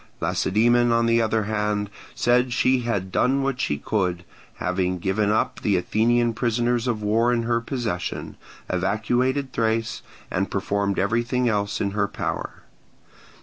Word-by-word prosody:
Lacedaemon, 120 Hz, +4 st, +2 dB
on 115 Hz, 0 st, +3 dB
the 115 Hz, 0 st, +3 dB
other 110 Hz, -1 st, +1 dB
hand, 105 Hz, -1 st, -1 dB, 0.3 s
said 125 Hz, +1 st, +2 dB
she 130 Hz, +2 st, +3 dB
had 100 Hz, -6 st, -2 dB
done 135 Hz, +6 st, +2 dB
what 135 Hz, -2 st, -1 dB
she 70 Hz, -, 0 dB
could, 90 Hz, 0 st, -1 dB, 0.3 s
having 90 Hz, 0 st, -1 dB
given 100 Hz, +3 st, 0 dB
up 110 Hz, -, 0 dB
the 100 Hz, -3 st, +2 dB
Athenian 115 Hz, +6 st, +2 dB
prisoners 120 Hz, +2 st, 0 dB
of 110 Hz, -3 st, -1 dB
war 115 Hz, +3 st, +2 dB
in 120 Hz, -1 st, +1 dB
her 115 Hz, 0 st, 0 dB
possession, 115 Hz, -8 st, -4 dB, 0.3 s
evacuated 120 Hz, +8 st, 0 dB
Thrace, 115 Hz, 0 st, 0 dB, 0.3 s
and 95 Hz, +2 st, -1 dB
performed 100 Hz, 0 st, -1 dB
everything 120 Hz, +5 st, +1 dB
else 100 Hz, -2 st, 0 dB
in 100 Hz, -, -1 dB
her 100 Hz, 0 st, 0 dB
power. -, -, -5 dB
110 Hz, 145 wpm, -24 LUFS, 100-120 Hz, 0.3 s, on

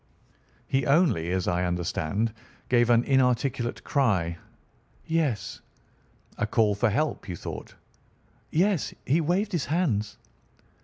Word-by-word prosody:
"He 135 Hz, -1 st, 0 dB
only, 140 Hz, -, +3 dB
as 95 Hz, 0 st, -1 dB
I 90 Hz, 0 st, +1 dB
understand, 90 Hz, +4 st, -1 dB, 0.4 s
gave 120 Hz, -1 st, +4 dB
an 120 Hz, 0 st, +5 dB
inarticulate 125 Hz, -2 st, +1 dB
cry?" 95 Hz, -, +1 dB, 0.7 s
"Yes." 150 Hz, -12 st, -1 dB, 0.8 s
"A -, -, +1 dB
call 105 Hz, -2 st, +3 dB
for 110 Hz, +3 st, +1 dB
help, 145 Hz, -1 st, -1 dB
you 90 Hz, -, -3 dB
thought?" -, -, -8 dB, 0.7 s
"Yes. 180 Hz, 0 st, +1 dB
He 155 Hz, +6 st, +2 dB
waved 185 Hz, +6 st, 0 dB
his 170 Hz, -6 st, -1 dB
hands." 140 Hz, -, 0 dB
120 Hz, 115 wpm, -27 LUFS, 100-155 Hz, 0.8 s, an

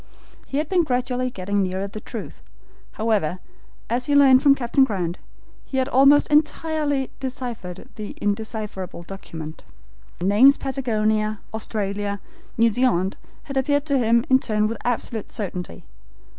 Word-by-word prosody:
He 275 Hz, -, -3 dB
had 300 Hz, +1 st, 0 dB
been 360 Hz, -1 st, +3 dB
gradually 255 Hz, -2 st, -1 dB
getting 200 Hz, -2 st, -1 dB
nearer 190 Hz, +1 st, -1 dB
the 205 Hz, +2 st, -7 dB
truth, -, -, -8 dB, 0.5 s
however, 210 Hz, -7 st, 0 dB, 0.5 s
as 245 Hz, +2 st, -1 dB
he 290 Hz, -, +2 dB
learned 270 Hz, -2 st, +7 dB
from 280 Hz, -2 st, +6 dB
Captain 265 Hz, +1 st, +2 dB
Grant. 185 Hz, -8 st, -1 dB, 0.4 s
He 265 Hz, -, -5 dB
had 260 Hz, -1 st, +2 dB
almost 275 Hz, +3 st, +6 dB
entirely 300 Hz, -2 st, +1 dB
deciphered 245 Hz, -9 st, -6 dB
the 210 Hz, -1 st, -6 dB
indecipherable 205 Hz, -4 st, -3 dB
document. 165 Hz, -4 st, -8 dB, 0.5 s
The 175 Hz, -, -4 dB
names 235 Hz, +8 st, +6 dB
Patagonia, 215 Hz, -5 st, 0 dB
Australia, 205 Hz, -2 st, -3 dB, 0.4 s
New 230 Hz, 0 st, +4 dB
Zealand, 205 Hz, -6 st, +1 dB, 0.3 s
had 275 Hz, -2 st, -5 dB
appeared 285 Hz, +2 st, +1 dB
to 280 Hz, -3 st, +2 dB
him 235 Hz, 0 st, +3 dB
in 260 Hz, 0 st, +5 dB
turn 215 Hz, -4 st, 0 dB
with 230 Hz, -, -4 dB
absolute 235 Hz, -2 st, -2 dB
certainty. 180 Hz, -, -5 dB
230 Hz, 140 wpm, -23 LUFS, 200-265 Hz, 0.5 s, learned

